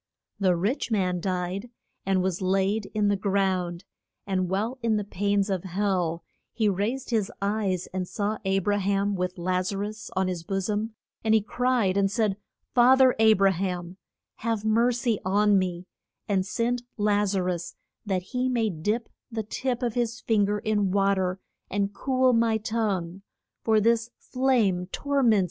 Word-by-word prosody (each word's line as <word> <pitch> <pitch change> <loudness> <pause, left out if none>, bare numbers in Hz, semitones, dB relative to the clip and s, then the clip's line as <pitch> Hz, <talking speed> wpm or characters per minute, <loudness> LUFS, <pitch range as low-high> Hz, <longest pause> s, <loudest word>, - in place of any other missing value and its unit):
The 185 -3 +3
rich 205 - -1
man 185 -5 +1
died 185 +4 -3 0.4
and 190 -1 +2
was 190 -1 -1
laid 195 +3 +1
in 210 -1 +2
the 205 - +3
ground. 190 -3 0 0.4
And 185 -2 -1
while 220 +7 -1
in 230 -1 +1
the 210 - -1
pains 200 0 0
of 190 -4 -2
hell 185 -3 -1 0.3
he 220 -2 0
raised 215 +7 -1
his 215 -4 +1
eyes 200 -3 -1
and 185 -1 -2
saw 210 +1 -2
A 195 0 +1
bra 205 +2 +1
ham 200 +1 +1
with 180 -1 -2
Laz 185 +2 0
a 200 - -3
rus 210 +2 -5
on 190 0 +1
his 180 -3 -3
bo 195 +3 -2
som, 210 +3 -2 0.3
and 220 0 +4
he 220 - +4
cried 240 -5 +1
and 195 -1 +3
said, 205 -2 0 0.4
Fa 250 +1 +7
ther 260 -1 +6
A 220 0 +7
bra 195 -1 +4
ham, 180 -1 -3 0.4
have 225 -2 -2
mer 230 +3 +3
cy 235 -3 0
on 205 +1 +3
me, 180 -1 -3 0.4
and 190 -2 +1
send 240 +3 0 0.2
Laz 205 -1 +2
a 185 - +1
rus 180 -1 -3 0.3
that 190 -3 -1
he 250 +6 -1
may 230 -4 +1
dip 210 +8 -2 0.2
the 225 -1 -2
tip 250 +3 -3
of 240 -2 0
his 235 -1 -1
fin 210 -3 +2
ger 205 +1 0
in 210 -2 0
wa 200 +1 +3
ter 185 -1 -1 0.3
and 200 0 -1
cool 255 +3 +2
my 230 -1 +3
tongue, 200 -5 -2 0.4
for 220 -1 +4
this 230 +2 +2
flame 230 -9 +1
tor 280 +8 -1
ments 230 -4 +5
me. - - +4
200 Hz, 180 wpm, -26 LUFS, 190-225 Hz, 0.4 s, Fa